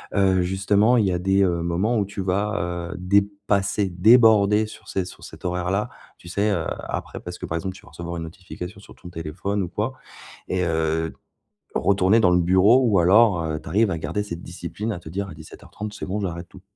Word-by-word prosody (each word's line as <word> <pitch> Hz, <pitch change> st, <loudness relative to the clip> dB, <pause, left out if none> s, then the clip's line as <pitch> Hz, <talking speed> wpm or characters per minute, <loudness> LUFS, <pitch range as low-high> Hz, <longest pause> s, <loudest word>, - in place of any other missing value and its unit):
heu, 95 Hz, -2 st, +3 dB
justement, 100 Hz, +6 st, +2 dB
il 110 Hz, -, +3 dB
y 95 Hz, -, +1 dB
a 90 Hz, -, 0 dB
des, 95 Hz, +2 st, +2 dB
heu, 85 Hz, -3 st, +1 dB
moments 95 Hz, +8 st, 0 dB
où 105 Hz, -, +1 dB
tu 100 Hz, 0 st, -6 dB
vas, 90 Hz, -3 st, -1 dB
heu, -, -, -9 dB
dépasser, 100 Hz, +1 st, +1 dB
déborder 105 Hz, +2 st, +5 dB
sur -, -, -13 dB
c 95 Hz, -, -1 dB
sur 90 Hz, -, -12 dB
cet -, -, -11 dB
horaire-là? 90 Hz, +5 st, -1 dB, 0.3 s
Tu -, -, -15 dB
sais, 100 Hz, +4 st, +1 dB
heu, 85 Hz, -5 st, -1 dB, 0.2 s
après, -, -, -5 dB
parce 90 Hz, 0 st, -8 dB
que, -, -, -5 dB
par 80 Hz, -, -3 dB
exemple, 95 Hz, +3 st, -4 dB
tu -, -, -13 dB
vas -, -, -16 dB
recevoir 85 Hz, 0 st, -6 dB
une 85 Hz, -, -4 dB
notification 90 Hz, +3 st, -9 dB
sur 100 Hz, -, -15 dB
ton 90 Hz, -, -12 dB
téléphone 90 Hz, +5 st, -3 dB
ou -, -, -3 dB
quoi. 105 Hz, +8 st, -2 dB, 0.6 s
Et, 90 Hz, -1 st, 0 dB
heu, 80 Hz, -1 st, 0 dB, 0.6 s
retourner 100 Hz, +2 st, +3 dB
dans 90 Hz, -5 st, +4 dB
le 90 Hz, -, +4 dB
bureau 95 Hz, +9 st, +5 dB
ou 105 Hz, -5 st, +3 dB
alors, 95 Hz, 0 st, +5 dB
heu, 80 Hz, -1 st, -2 dB
tu -, -, -14 dB
arrives 105 Hz, +5 st, +3 dB
à 85 Hz, -, -1 dB
garder 105 Hz, +6 st, -2 dB
cette 85 Hz, -4 st, -7 dB
discipline, 90 Hz, +6 st, -5 dB
à 90 Hz, -, -4 dB
te 85 Hz, -, -11 dB
dire: 100 Hz, +4 st, -3 dB
«À -, -, -8 dB
17:30 105 Hz, +6 st, -9 dB
c'est -, -, -6 dB
bon, 100 Hz, +3 st, -3 dB
j'arrête 85 Hz, -2 st, -4 dB
tout»? 95 Hz, -, -14 dB
95 Hz, 220 wpm, -23 LUFS, 85-105 Hz, 0.6 s, déborder